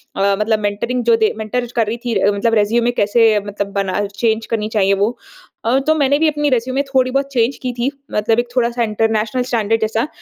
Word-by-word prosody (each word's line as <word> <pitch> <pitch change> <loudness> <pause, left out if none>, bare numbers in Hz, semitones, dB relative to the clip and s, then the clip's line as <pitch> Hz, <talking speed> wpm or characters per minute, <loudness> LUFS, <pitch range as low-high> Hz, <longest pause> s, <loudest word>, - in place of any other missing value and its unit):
अ, - - -5 0.2
मतलब 215 0 +1
मेंटरिंग 215 +5 -2
जो - - +6
दे - - 0
मेंटर 220 +3 -2
छ 240 - -12
कर 220 - 0
रही 230 +2 -2
थी 240 - -1 0.2
मतलब 205 +3 0
रिज्यूमे 230 +3 +2
कैसे 220 -1 +3
मतलब 200 -1 -4
बना 200 0 -1
चेंज 225 +1 0
करनी 215 -2 -2
चाहिए 200 -3 +2
वो। 205 +5 0 0.5
अ, 240 +3 +3
तो 315 - +5
मैंने 285 -2 +2
भी 320 - +3
अपनी 295 -1 0
रिज्यूमे 255 +2 0
थोड़ी 260 -2 +1
बहुत 275 +1 +1
चेंज 240 +1 +1
की 255 - -2
थी, 240 +2 -1 0.2
मतलब 220 +2 +1
एक 240 - -1
थोड़ा-सा 240 -1 +1
इंटरनेशनल 220 +2 0
स्टैंडर्ड 225 -3 0
जैसा। 220 +4 0
230 Hz, 210 wpm, -18 LUFS, 215-250 Hz, 0.5 s, जो